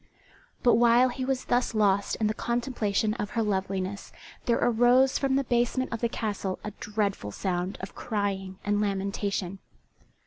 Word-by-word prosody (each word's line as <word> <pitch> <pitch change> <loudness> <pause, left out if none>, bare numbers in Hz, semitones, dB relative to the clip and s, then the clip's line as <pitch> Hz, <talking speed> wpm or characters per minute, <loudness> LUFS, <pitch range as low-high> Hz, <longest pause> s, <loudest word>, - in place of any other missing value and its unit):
But 245 - +5
while 240 +2 +5
he 255 +1 -4
was 260 0 -1
thus 245 -1 +1
lost 200 -2 +2
in 220 - -1
the 215 - +1
contemplation 230 -3 -1
of 205 - -2
her 225 - +3
loveliness 195 -1 -2 0.4
there 235 - +3
arose 245 +3 +4
from 270 -1 +1
the 275 - +2
basement 240 +1 0
of 230 - -4
the 235 - +1
castle 205 -5 -3
a 210 - -4
dreadful 205 - -2
sound 180 - -2
of 190 - -7
crying 195 -3 -3
and 205 0 +1
lamentation. 195 -1 -2
210 Hz, 160 wpm, -27 LUFS, 195-240 Hz, 0.4 s, But